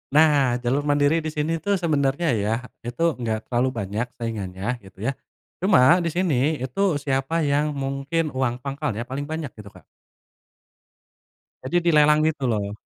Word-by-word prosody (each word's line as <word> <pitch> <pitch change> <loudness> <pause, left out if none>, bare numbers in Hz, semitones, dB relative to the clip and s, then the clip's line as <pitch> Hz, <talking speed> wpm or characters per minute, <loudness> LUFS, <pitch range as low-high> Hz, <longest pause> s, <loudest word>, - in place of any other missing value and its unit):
Nah, 145 -6 +4
jalur 135 +4 +1
mandiri 145 +3 +3
di 155 - -3
sini 155 +2 -2
tuh 200 -1 +1
sebenarnya 150 -1 0
ya, 105 0 0 0.3
itu 120 +7 -4 0.2
enggak 110 -2 -2
terlalu 125 +1 +1
banyak 105 +5 -2
saingannya 110 0 -4
gitu 95 +2 -10
ya. 135 - +2 0.5
Cuma 180 -3 +5
di 170 - 0
sini, 155 -4 +1
itu 175 +6 0
siapa 140 +3 -1
yang 145 +1 +1
mungkin 140 +4 -2
uang 130 -2 0
pangkal 135 -6 -3
ya 115 - -2
paling 140 +3 -5
banyak 160 -4 -4
gitu, 105 -2 -11
Kak. 95 -3 -18 1.8
Jadi 155 +7 -1 0.2
dilelang 150 0 +5
gitu 150 -4 0
loh. 105 -3 -1
140 Hz, 155 wpm, -23 LUFS, 120-155 Hz, 1.8 s, Cuma